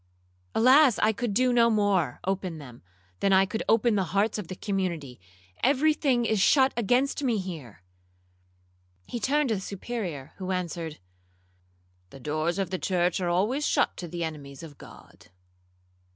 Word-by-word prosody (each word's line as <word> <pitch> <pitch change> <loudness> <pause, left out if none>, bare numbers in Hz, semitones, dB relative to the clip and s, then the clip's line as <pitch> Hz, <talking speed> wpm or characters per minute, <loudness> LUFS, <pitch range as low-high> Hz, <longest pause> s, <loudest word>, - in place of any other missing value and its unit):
—Alas! 260 +1 +6
I 215 - +3
could 225 -1 -2
no 245 -2 +4
more 200 - +1
open 185 -3 -2
them, 125 -5 -12 0.4
than 195 - +1
I 190 0 +5
could 210 +3 -4
open 230 +1 +3
the 195 -2 +1
hearts 210 +1 +1
of 195 - -6
the 185 - -6
community—every 170 - -2
thing 260 -6 +1
is 220 -3 +1
shut 265 +5 +4
against 245 +6 +1
me 240 -5 +1
here.' 155 - -7 1.2
He 240 - -5
turned 285 +4 +1
to 220 - +1
the 190 - -4
Superior, 190 - -6
who 185 -1 -6
answered, 170 -4 -3 1.1
'The 135 - -13
doors 155 +5 -2
of 190 -3 -2
the 185 - -2
church 180 -1 0
are 175 - 0
always 210 +12 0
shut - - +1
to 175 - -6
the 170 +1 -4
enemies 145 -3 -7
of 150 -4 -12
God.' - - -15
190 Hz, 155 wpm, -27 LUFS, 165-235 Hz, 1.2 s, Alas